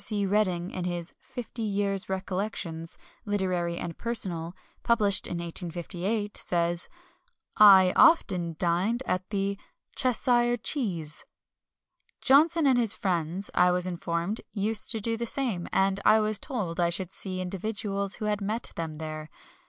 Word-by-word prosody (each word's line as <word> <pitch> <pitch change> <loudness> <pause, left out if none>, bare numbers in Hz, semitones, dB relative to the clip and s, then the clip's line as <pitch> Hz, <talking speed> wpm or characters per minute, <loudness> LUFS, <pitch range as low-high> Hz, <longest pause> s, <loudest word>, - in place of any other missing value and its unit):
C. 205 -2 -1
Redding, 185 -3 0
in 180 -1 -4
his 175 -1 -3
Fifty 240 -1 -8
Years' 200 -2 -1
Recollections, 185 -3 -3 0.3
Literary 185 -5 -1
and 170 -2 -5
Personal, 180 -7 -1 0.3
published 210 -4 +2
in 175 - -4
1858, 175 +5 -3
says: 170 0 0 0.7
"I 190 -3 +8
often 180 - +4
dined 185 +9 0
at 185 0 -2
the 200 -1 -2 0.4
"Cheshire 240 -1 +2
Cheese." 185 - -2 1.0
Johnson 310 +4 +4
and 260 -3 +4
his 225 -3 +3
friends, 180 +1 -2
I 180 - +4
was 180 0 0
informed, 175 +3 -2
used 215 +1 +2
to 225 - -2
do 225 +2 -2
the 235 +1 -3
same, 225 -10 0
and 195 0 +2
I 215 +1 +6
was 215 -1 +2
told 195 - -4
I 170 -1 +3
should 180 +1 -3
see 185 -2 -4
individuals 200 +1 -3
who 215 - -5
had 210 -1 -1
met 215 +4 -3
them 160 -2 -4
there. 155 0 -6
195 Hz, 140 wpm, -27 LUFS, 175-215 Hz, 1.0 s, I